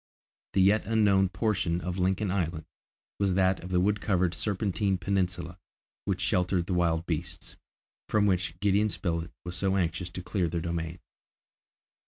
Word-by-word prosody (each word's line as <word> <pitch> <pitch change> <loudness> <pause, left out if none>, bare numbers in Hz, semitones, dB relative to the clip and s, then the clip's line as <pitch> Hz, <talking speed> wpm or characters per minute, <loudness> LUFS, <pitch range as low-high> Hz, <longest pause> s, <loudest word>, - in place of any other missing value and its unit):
The 95 - +4
yet 100 +2 +3
unknown 100 -4 +4
portion 90 -3 0
of 90 +2 -4
Lincoln 95 +2 +1
Island 85 -4 -2 0.5
was 100 -2 +2
that 95 0 +3
of 90 - -7
the 90 -1 +2
wood 105 +3 +1
covered 90 -4 +1
Serpentine 100 +1 0
Peninsula, 90 -2 -2 0.5
which 90 -2 -1
sheltered 90 -2 +1
the 90 - -2
wild 85 -1 +1
beasts, 80 -1 -4 0.5
from 105 -1 +3
which 90 -3 0
Gideon 105 +1 +3
Spilett 85 -4 -2 0.2
was 90 0 -5
so 95 +2 0
anxious 85 0 -1
to 90 +1 -7
clear 90 0 0
their 85 +1 -2
domain. 85 0 -3
90 Hz, 155 wpm, -28 LUFS, 85-100 Hz, 0.5 s, The